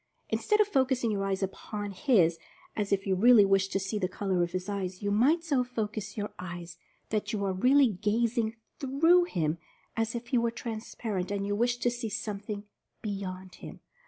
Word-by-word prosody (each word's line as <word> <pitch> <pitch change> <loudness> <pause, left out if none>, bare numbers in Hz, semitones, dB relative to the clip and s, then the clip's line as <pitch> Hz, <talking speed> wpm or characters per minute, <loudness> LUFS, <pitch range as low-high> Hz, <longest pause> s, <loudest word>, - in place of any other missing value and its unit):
Instead 425 0 +1
of 425 - +5
focusing 260 - +1
your 200 -1 -1
eyes 195 0 -1
upon 205 +2 -4
his, 185 - +3 0.4
as 205 -2 -2
if 195 -1 +1
you 195 - +1
really 215 +2 +7
wished 195 0 +2
to 195 - +1
see 195 +2 -2
the 185 - +1
color 190 -2 -1
of 175 0 0
his 185 +1 -3
eyes, 190 -2 -4
you 205 - 0
must 280 +11 +3
so 280 -6 +2
focus 215 -4 -4
your 205 0 -3
eyes 175 -1 -7 0.3
that 215 -1 -1
you 200 -2 -1
are 190 - 0
really 260 +7 +5
gazing 220 +3 0 0.2
through 325 +7 +4
him, 165 - -1 0.4
as 225 +1 -1
if 235 0 -5
he 245 - +3
were 235 0 +1
transparent 220 -4 -4
and 200 0 -2
you 205 0 -1
wished 245 +2 0
to 245 - +3
see 240 -2 -4
something 210 -1 -4 0.4
beyond 190 -3 -5
him. - - -9
210 Hz, 190 wpm, -29 LUFS, 195-240 Hz, 0.4 s, really